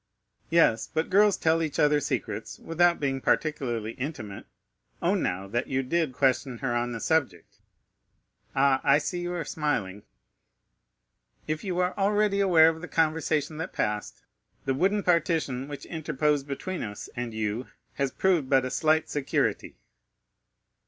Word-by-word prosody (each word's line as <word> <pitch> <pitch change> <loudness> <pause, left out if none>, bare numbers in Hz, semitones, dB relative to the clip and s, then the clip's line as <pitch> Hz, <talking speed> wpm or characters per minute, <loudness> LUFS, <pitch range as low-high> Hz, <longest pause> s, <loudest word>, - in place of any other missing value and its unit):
"Yes, 160 -10 +3
but 160 +3 -1
girls 205 +1 +5
tell 160 0 +2
each 155 -3 -2
other 150 0 +4
secrets - - -4
without 170 +1 +2
being 135 -2 -1
particularly 120 -9 0
intimate; 120 -6 -6 0.5
own, - - +1
now, 95 +2 -2
that 120 +5 -2
you 135 0 -1
did 160 +2 0
question 130 -1 +1
her 120 -1 -2
on 120 0 -1
the 115 - -4
subject. 130 - -1 1.0
Ah, 135 0 +3
I 140 - +5
see 175 +4 -3
you 175 0 -3
are 170 -3 -3
smiling." 105 -11 -2 1.4
"If 155 0 -3
you 185 -3 -3
are 180 0 0
already 205 0 +2
aware 170 -5 +6
of 160 0 -5
the 180 - -6
conversation 155 -1 0
that 165 - -5
passed, 105 0 -3 0.4
the 135 - +1
wooden 195 +8 +1
partition 160 -7 +1
which 145 -1 -8
interposed 150 -3 -1
between 175 +6 -4
us 105 -1 -6
and 120 -1 -3
you 110 +2 -3 0.3
has 140 -1 -1
proved 170 -2 +1
but 135 -2 +4
a 130 - -4
slight 155 0 +2
security." 145 -2 -1
150 Hz, 150 wpm, -27 LUFS, 130-165 Hz, 1.4 s, aware